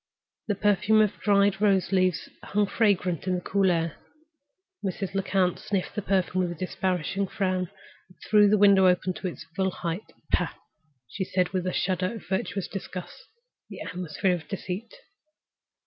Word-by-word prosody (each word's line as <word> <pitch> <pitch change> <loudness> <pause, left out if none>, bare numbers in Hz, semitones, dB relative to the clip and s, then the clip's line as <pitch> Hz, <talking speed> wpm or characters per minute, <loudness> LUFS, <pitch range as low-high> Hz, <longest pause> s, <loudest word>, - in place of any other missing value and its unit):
The 205 - +1
perfume 205 +2 +3
of 210 -2 +1
dried 200 -1 +3
rose 195 -3 +3
leaves 185 -3 +2
hung 210 0 +1
fragrant 190 -5 +1
on 185 - +2
the 180 - -3
cool 195 +1 +2
air. 165 -2 0 0.9
Mrs. 190 0 -3
Lecount 190 -2 +1
sniffed 200 -3 -2
the 210 - -2
perfume 185 -1 +1
with 175 -1 -1
a 160 - -15
disparaging 185 +1 -1
frown 185 -2 -1 0.4
and 180 - -21
threw 210 -1 +6
the 210 - +4
window 195 -2 +6
up 180 -1 +3
to 185 +1 -3
its 175 - -6
full 190 0 +1
height. 175 +2 -5 0.2
"Pah!" - - +1 0.5
she 190 - -4
said, 185 -1 0
with 185 -1 -2
a - - +1
shudder 185 +3 0
of 220 - -10
virtuous 190 0 -2
disgust, 185 -2 -7 0.4
"the - - -9
atmosphere 180 +1 -1
of 175 -3 -5
deceit!" 195 +1 -5
190 Hz, 165 wpm, -27 LUFS, 180-200 Hz, 0.9 s, threw